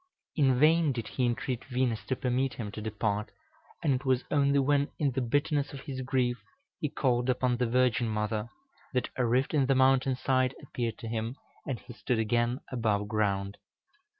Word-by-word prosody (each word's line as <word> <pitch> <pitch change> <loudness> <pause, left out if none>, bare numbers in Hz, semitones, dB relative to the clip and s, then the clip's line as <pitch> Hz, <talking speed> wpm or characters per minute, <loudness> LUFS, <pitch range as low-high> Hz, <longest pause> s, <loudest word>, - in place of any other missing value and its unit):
In 135 -5 +3
vain 160 +1 +5
did 115 -3 -4
he 125 -2 0
entreat 120 +1 -2
Venus 125 -3 -1
to 130 - -1
permit 130 +1 0
him 105 -4 -5
to 105 - -7
depart, 105 0 -2 0.5
and 145 -4 +3
it 130 +1 -2
was 130 -2 +2
only 140 -1 +3
when, 140 +1 +2
in 145 -3 +1
the 130 +1 -1
bitterness 145 +3 0
of 135 - -7
his 135 -3 -5
grief, 125 -2 0 0.4
he 150 - -1
called 125 -2 +1
upon 125 -1 +1
the 125 -1 +1
Virgin 125 0 +2
Mother, 105 +1 -2 0.5
that 125 - 0
a 130 - 0
rift 130 +5 +1
in 140 -4 +3
the 135 - +3
mountain 130 0 +4
side 130 0 +1
appeared 120 -5 -3
to 115 - -7
him, 115 +2 -3 0.3
and 135 - -1
he 120 - -12
stood 120 +1 -1
again 120 +3 +1
above 110 -5 0
ground. 100 -2 -1
125 Hz, 185 wpm, -29 LUFS, 115-135 Hz, 0.5 s, vain